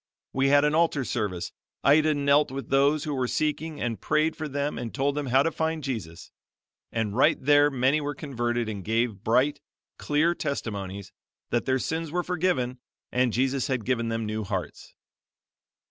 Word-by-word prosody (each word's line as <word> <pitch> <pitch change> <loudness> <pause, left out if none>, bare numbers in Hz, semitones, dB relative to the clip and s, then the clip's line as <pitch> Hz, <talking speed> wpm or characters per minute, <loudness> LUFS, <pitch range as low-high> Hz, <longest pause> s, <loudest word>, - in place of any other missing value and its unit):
We 135 +1 +2
had 145 +1 +5
an 150 - +2
altar 160 -4 +2
service. 100 -8 -2 0.3
Ida 150 +2 +4
knelt 145 +1 +3
with 135 +1 -6
those 140 +2 +3
who 150 -3 -3
were 130 -2 0
seeking 155 +5 -2
and 115 -2 -3
prayed 155 +1 +1
for 155 - -4
them 145 -2 -2
and 120 -2 -5
told 140 +1 0
them 145 -1 -3
how 130 +2 +4
to 165 - 0
find 160 -1 -2
Jesus; 105 -12 -5 0.6
and 110 -3 -2
right 130 - +4
there 145 +1 +5
many 135 +3 +2
were 145 0 -3
converted 120 -5 -2
and 100 -3 -5
gave 110 -1 -1
bright, 130 +6 +2 0.4
clear 155 +4 +2
testimonies 100 - -4 0.4
that 120 - +1
their 130 0 +2
sins 160 +4 -3
were 175 +1 0
forgiven 160 -9 -1 0.3
and 125 -1 +2
Jesus 130 +4 0
had 130 -6 -2
given 115 -3 0
them 115 0 -2
new 110 0 -3
hearts. 95 - -5
135 Hz, 175 wpm, -26 LUFS, 120-150 Hz, 0.6 s, had